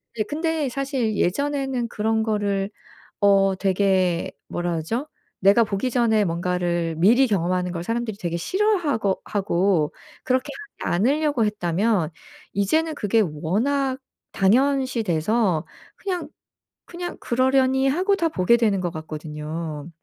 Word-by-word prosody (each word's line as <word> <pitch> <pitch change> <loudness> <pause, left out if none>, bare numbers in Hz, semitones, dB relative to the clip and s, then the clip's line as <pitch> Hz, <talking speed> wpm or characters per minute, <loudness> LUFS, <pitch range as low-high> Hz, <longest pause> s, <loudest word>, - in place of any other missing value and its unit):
네 215 - 0
근데 310 +3 -1
사실 260 -4 -1
예전에는 270 +3 0
그런 220 0 0
거를 205 -3 0 0.5
어 195 -1 +4
되게 185 -2 +1 0.2
뭐라 175 0 -2
그러죠? 195 - -2 0.3
내가 200 +4 +5
보기 205 +5 -2
전에 225 -3 +3
뭔가를 170 -1 -1
미리 235 +10 +5
경험하는 180 -3 0
걸 170 -1 -4
사람들이 230 0 -3
되게 170 -4 -3
싫어하거 315 - +1
하고 190 -5 +1 0.3
그렇게 255 +2 0 0.3
하지 - - -3
않으려고 275 - +2
했다면 200 -2 0 0.4
이제는 310 - +1
그게 220 -1 +2
워낙 225 - 0 0.3
당연시 260 +4 +2
돼서 180 0 +1 0.3
그냥 360 -6 -4 0.6
그냥 350 0 -6
그러려니 265 +1 +2
하고 370 +8 +2
다 335 -4 +1
보게 235 - +3
되는 215 -5 +1
것 175 -1 -2
같거든요. 155 0 -6
210 Hz, 280 characters per minute, -23 LUFS, 180-265 Hz, 0.6 s, 내가